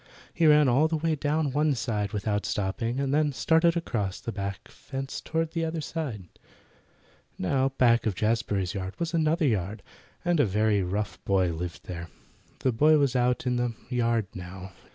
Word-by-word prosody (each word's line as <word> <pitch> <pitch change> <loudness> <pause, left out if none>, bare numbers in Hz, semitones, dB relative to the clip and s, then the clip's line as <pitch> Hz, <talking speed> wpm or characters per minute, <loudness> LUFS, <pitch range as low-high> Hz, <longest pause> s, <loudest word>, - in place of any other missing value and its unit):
He 165 -2 +3
ran 150 -1 +6
all 135 +6 +4
the 160 0 -1
way 160 +1 0
down 150 0 0
one 150 +1 +2
side 105 -4 -2
without 105 0 -1
stopping, 115 +5 -2
and 140 0 0
then 150 0 +3
started 165 +6 +3
across 105 - -2
the 115 - -5
back 100 -2 -5
fence 135 0 -6
toward 165 0 -1
the 165 -1 -2
other 165 0 -2
side. 145 - -4 1.1
Now 135 +8 +1
back 120 -2 +4
of 105 - 0
Jazbury's 105 -3 0
yard 95 0 -4
was 170 0 -2
another 160 0 +2
yard, 105 -4 -1 0.4
and 175 -2 +2
a 145 - +5
very 105 +1 +2
rough 100 +3 -3
boy 95 -3 +2
lived 85 +1 -6
there. 85 -1 -6 0.5
The 130 - +2
boy 150 +7 +5
was 140 -3 +2
out 125 0 +1
in 125 -1 +1
the 120 -1 -1 0.2
yard 115 -3 +1
now. 95 +1 -8
120 Hz, 175 wpm, -27 LUFS, 100-150 Hz, 1.1 s, ran